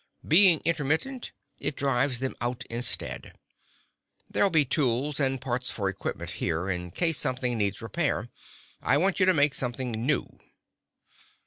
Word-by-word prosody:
Being 170 0 +6
intermittent, 165 - -1 0.3
it 145 - -2
drives 135 -2 +1
them 130 - -2
out 120 0 -3
instead. 120 +1 -1 0.9
There'll 200 - +2
be 155 -5 +3
tools 135 +2 0
and 135 -2 0
parts 125 0 -3
for 100 -3 -2
equipment 95 - -5
here, 85 +4 -1
in 90 -1 -4
case 165 - +2
something 125 -1 0
needs 100 -1 -1
repair. 145 +1 -1 0.5
I 135 - +2
want 190 +5 +1
you 185 - +4
to 185 - +5
make 145 -1 +3
something 125 -1 -3
new." 120 +6 -2
135 Hz, 140 wpm, -27 LUFS, 120-155 Hz, 0.9 s, Being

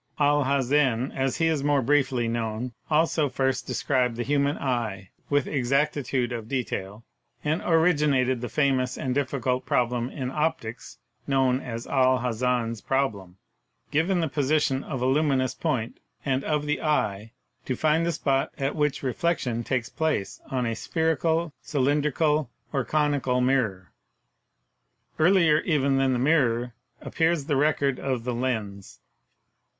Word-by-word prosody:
Al 145 -1 +3
Hazen 135 -2 +1
(as 135 -1 -1
he 165 - +1
is 160 -4 +1
more 145 -2 +2
briefly 130 -3 +2
known) 115 +1 -3 0.2
also 155 -1 +2
first 130 -1 -1
described 125 -4 0
the 120 - -2
human 140 +2 +1
eye 115 -8 -3 0.2
with 145 -2 +2
exactitude 135 -1 0
of 115 -2 -5
de 130 -2 0
tail, 100 +1 -6 0.4
and 155 +3 0
originated 150 -7 +2
the 120 - -4
famous 130 -1 +1
and 130 - -2
difficult 130 -2 -1
problem 120 0 0
in 130 -3 -4
optics 135 -6 -3 0.3
known 130 -2 +2
as 115 -3 -6
Al 130 -1 +3
Hazen's 120 -2 -1
problem: 105 -10 -2 0.5
"Given 170 +4 +1
the 165 - 0
position 140 -1 +1
of 130 -4 -4
a - - +2
luminous 135 -1 +2
point 115 -2 -2 0.3
and 135 -1 0
of 150 -1 0
the 150 -2 -1
eye, 110 -8 -1 0.3
to 130 - -1
find 155 +3 +2
the 170 - +1
spot 135 -3 0
at 135 +1 -1
which 150 -2 0
reflection 130 -3 -1
takes 125 -2 -2
place 155 -11 -2
on 130 -2 -1
a 115 - -1
spherical, 160 +3 0
cylindrical 150 0 +1 0.2
or 135 - +1
conical 145 -2 +1
mirror." 120 -8 0 1.3
Earlier 165 -2 +5
even 140 -5 +1
than 135 -1 +2
the - - +1
mirror 125 -4 +2 0.3
appears 165 -3 0
the 145 -1 0
record 140 -1 +1
of 130 -4 -2
the 125 0 -2
lens. 110 -6 -3
135 Hz, 145 wpm, -26 LUFS, 125-150 Hz, 1.3 s, Earlier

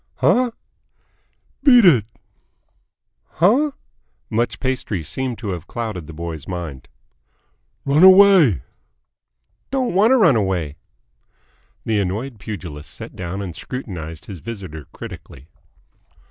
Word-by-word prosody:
"Huh?" 250 0 +3 1.1
"Beat 245 -6 +7
it!" 130 - +6 1.3
"Huh?" 255 - +3 0.6
Much 115 +2 -1
pastry 125 - -2
seemed 125 - -4
to 110 - -5
have 90 -2 -5
clouded 110 -9 -5
the - - -8
boy's 80 -2 -6
mind. 85 -8 -6 1.0
"Run 140 +3 +3
away." 185 - +7 1.1
"Don't 260 -5 -1
want 200 +5 +4
to 265 - +5
run 170 - +5
away." 90 -8 -1 1.1
The 110 -2 +1
annoyed 105 +6 -3
pugilist 85 -8 -8
sat - - -10
down 95 +2 -5
and 90 -4 -7
scrutinised 85 - -7
his 95 -4 -8
visitor 95 - -8
critically. 70 +3 -11
105 Hz, 110 wpm, -20 LUFS, -, 1.3 s, Beat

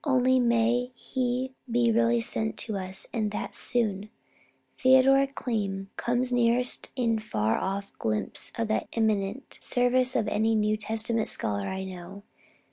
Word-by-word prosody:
Only, 260 -2 +3
may 240 +1 +2
he 255 +1 -2 0.2
be 235 0 +2
really 230 +1 +3
sent 220 -1 -2
to 220 - -4
us, 190 0 -2
and 220 -3 0
that 205 - -5
soon! 215 -4 -1 0.7
Theodor 265 +1 +5
Keim 200 -7 -3
comes 245 +1 0
nearest 245 +1 +2
a 230 -3 +1
far 110 - -1
off 200 +1 -4
glimpse 110 -1 -2
of 230 -1 -1
that 220 - 0
eminent 220 +2 -1
service 250 +1 +2
of 210 - +1
any 220 +2 +1
New 215 0 +2
Testament 220 +1 -1
scholar 100 -1 -1
I 190 0 -4
know. 190 +1 -9
225 Hz, 140 wpm, -27 LUFS, 200-245 Hz, 0.7 s, Theodor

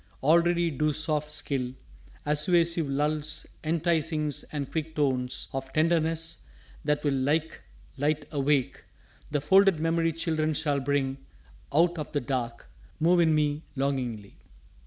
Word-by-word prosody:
Already 170 +2 +3
do 150 +2 +1
soft 150 0 -1
skill, 130 -4 -3 0.5
Assuasive 165 +1 +3
lulls, 150 +2 -1 0.2
enticings 155 -2 0
and 145 -3 -4
quick 160 0 -3
tones 130 -4 0
Of 135 0 -4
tenderness 165 0 +1 0.4
that 150 -1 0
will 145 -2 +1
like 150 +5 0 0.4
light 150 +2 0
awake 140 -2 0 0.5
The 145 -1 -1
folded 190 +3 +5
memory 165 0 +1
children 155 -1 -1
shall 145 -2 0
bring 135 0 -1 0.5
Out 170 +3 +3
of 150 - -6
the 145 - +1
dark 120 - -3 0.3
move 175 +3 +4
in 160 -2 +4
me 150 0 +1
longingly. 125 -7 -3
150 Hz, 125 wpm, -27 LUFS, 140-165 Hz, 0.5 s, folded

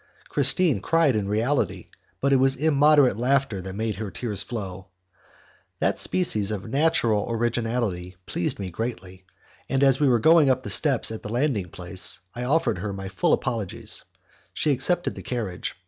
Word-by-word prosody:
Christine 165 - +2
cried 165 -1 +2
in 105 -2 -1
reality, 120 +7 -1 0.3
but 140 0 +2
it - - +6
was 135 +1 +3
immoderate 145 -4 +4
laughter 130 -4 +1
that 95 +1 -7
made 110 -1 -2
her 105 -1 -4
tears 105 -1 -3
flow. 95 -5 -6 0.9
That - - 0
species 110 - +2
of 105 0 -4
natural 120 -6 +1
originality 115 -5 -1
pleased 85 - -2
me 95 -2 -5
greatly, 95 -3 -6 0.4
and 135 +1 +1
as 135 -1 +4
we 145 - +3
were 120 - +4
going 160 +3 +5
up 130 0 +1
the - - -4
steps 135 -7 +2
at 110 - -6
the - - -7
landing 120 - -1
place, 90 +2 -4
I 120 +1 -4
offered 130 - +1
her 100 +2 -3
my 95 0 -6
full 95 - 0
apologies; 105 -6 -2 0.5
she 150 - +1
accepted 175 +7 +1
the - - -9
carriage. 110 -8 -4
115 Hz, 165 wpm, -25 LUFS, 100-140 Hz, 0.9 s, it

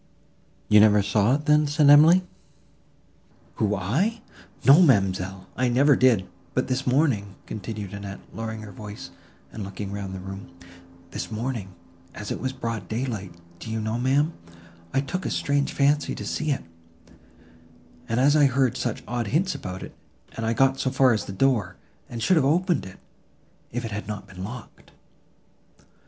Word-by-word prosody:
"You 105 - +6
never 105 -1 +6
saw 105 +4 +2
it, 150 +1 -4
then?" 150 0 +4
said 145 0 +3
Emily. 160 +5 +7 1.3
"Who, 105 -1 +1
I!—No, 150 - +1
ma'amselle, 95 - +2
I 125 -1 +1
never 135 +4 +4
did. 115 -8 +3 0.3
But - - +1
this 130 +1 -2
morning," 125 -8 +1
continued 105 -2 -6
Annette, 100 -1 -7
lowering 110 -1 -5
her 105 - -9
voice, 105 +7 -9 0.4
and 110 - -5
looking 100 +1 -6
round 100 -2 -5
the - - -6
room, 95 -1 -9 0.6
"this - - -5
morning, 110 -4 -4 0.4
as 105 - -6
it - - -3
was 130 - -2
broad 115 -4 -5
daylight, 110 -6 -4 0.2
do 110 - -8
you 110 0 -2
know, 110 +2 -2
ma'am, 140 +6 +2 0.6
I 135 - +1
took 180 +7 -4
a - - -2
strange 140 0 0
fancy 145 +1 +1
to - - -6
see 155 - -2
it, 140 - -1 1.5
as 130 +6 +3
I 150 -2 +6
had 135 - +3
heard 130 -3 +2
such - - -3
odd 120 -1 -2
hints 170 - +1
about 95 -10 -6
it, - - -9 0.4
and 115 0 -3
I 115 - +2
got 135 +3 +2
as 130 0 -1
far 130 -2 +5
as 105 -2 -2
the - - -7
door, 100 -4 +1 0.3
and 115 -1 -5
should 185 +7 +4
have 155 - +4
opened 170 - +1
it, 95 - -12 0.7
if 120 +1 -3
it 115 - -5
had 105 0 -5
not 105 -2 -5
been 90 0 -9
locked!" 120 +4 -9
115 Hz, 170 wpm, -25 LUFS, 100-140 Hz, 1.5 s, Emily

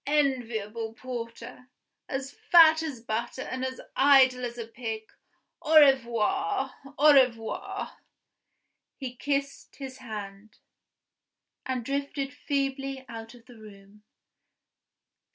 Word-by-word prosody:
Enviable 230 -6 -1
porter! 245 +1 -8 0.4
as 270 0 -4
fat 320 0 +6
as 290 -7 -5
butter 235 +3 -3
and 260 0 -5
as 260 0 -4 0.2
idle 265 -2 +5
as 240 0 -4
a 235 - -5
pig! 225 -1 -5 0.6
Au 310 +1 +6
revoir! 270 - +2 0.2
au 300 +1 +7
revoir!" 235 -5 0 1.0
He 255 -3 -6
kissed 280 +1 -3
his 265 -2 -8
hand, 210 -3 -8 1.1
and 255 -3 -2
drifted 280 0 -3
feebly 275 -2 -3
out 225 +1 -9
of 235 -1 -18
the 245 -3 -15
room. 205 -1 -15
255 Hz, 105 wpm, -28 LUFS, 230-275 Hz, 1.1 s, au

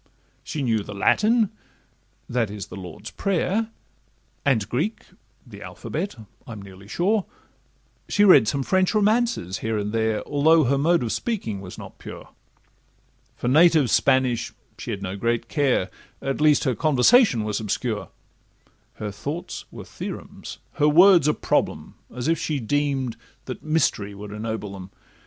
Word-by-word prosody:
She 150 - -4
knew 115 -3 +1
the 100 0 -8
Latin—that 210 - -1
is, 100 -1 -6
'the - - -11
Lord's 90 -4 -9
prayer,' 200 +3 0 0.7
And 120 -7 +1
Greek—the 175 - -6
alphabet—I'm 115 - -7
nearly 100 0 -12
sure; 195 - +1 0.8
She 205 - +3
read 185 - +7
some 140 +4 0
French 185 - +1
romances 210 - +1
here 110 0 -2
and 105 +1 -3
there, 110 -1 0
Although 155 +3 +4
her 135 +1 +1
mode 165 +1 +3
of 115 - -2
speaking 115 - -3
was 90 -2 -9
not - - -11
pure; - - -10 1.1
For - - -4
native 155 -1 +5
Spanish 130 -3 +2 0.2
she 115 - -8
had 100 -3 -4
no 95 0 -4
great 115 +2 -1
care, 135 - +1 0.3
At 135 +2 -3
least 150 -2 +4
her 130 - +1
conversation 150 - +4
was 105 -1 -2
obscure; 105 -2 -3 0.9
Her 105 -1 -5
thoughts 145 - -6
were - - -10
theorems, - - -8 0.2
her 150 - +6
words 175 0 +6
a 150 - +4
problem, - - -1 0.2
As 125 +3 -4
if 165 -1 +2
she 155 -3 -2
deem'd 135 0 -1 0.3
that - - -6
mystery 140 -10 0
would 105 +1 -9
ennoble 105 -1 -5
'em. 95 -1 -9
130 Hz, 140 wpm, -24 LUFS, 105-165 Hz, 1.1 s, read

